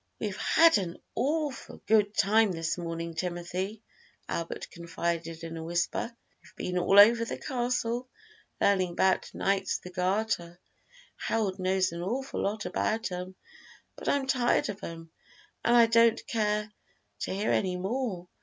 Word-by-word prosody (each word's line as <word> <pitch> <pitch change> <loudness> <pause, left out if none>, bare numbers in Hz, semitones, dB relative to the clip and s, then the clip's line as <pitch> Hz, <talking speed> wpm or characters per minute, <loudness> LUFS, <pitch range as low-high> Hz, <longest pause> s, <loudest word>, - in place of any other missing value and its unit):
"We've - - -3
had 330 -7 +5
an 175 -3 -4 0.2
awful 295 -1 -2
good 210 -1 +3
time 215 +1 +4
this 165 -1 -1
morning, 170 -1 -4
Timothy," 180 +5 -4 0.4
Albert 165 0 -4
confided 170 -1 -3
in 165 0 -6
a 160 - -5
whisper; 175 +7 -1 0.3
"we've - - -20
been 180 0 -2
all 195 +3 +5
over 230 +3 +8
the 230 - -4
castle, 245 -1 -2 0.5
learning 185 -3 +2
'bout 190 +1 +2
Knights 195 -1 0
of - - -21
the 180 - -8
Garter. 180 -1 -1 0.6
Harold 205 -5 -1
knows 185 0 +1
an 170 0 -5
awful 250 +9 -3
lot 205 +1 -2
about 220 -2 -1
'em, 180 +1 -5 0.6
but - - -4
I'm 280 -1 +1
tired 255 -2 +2
of 205 0 -6
'em, 165 -1 -8 0.5
an' 235 - +4
I 235 -1 +8
don't 230 0 +4
care 210 -1 -1 0.5
to - - -3
hear 200 +3 0
any 185 -2 +1
more. 195 -2 -3
195 Hz, 150 wpm, -29 LUFS, 175-225 Hz, 0.6 s, over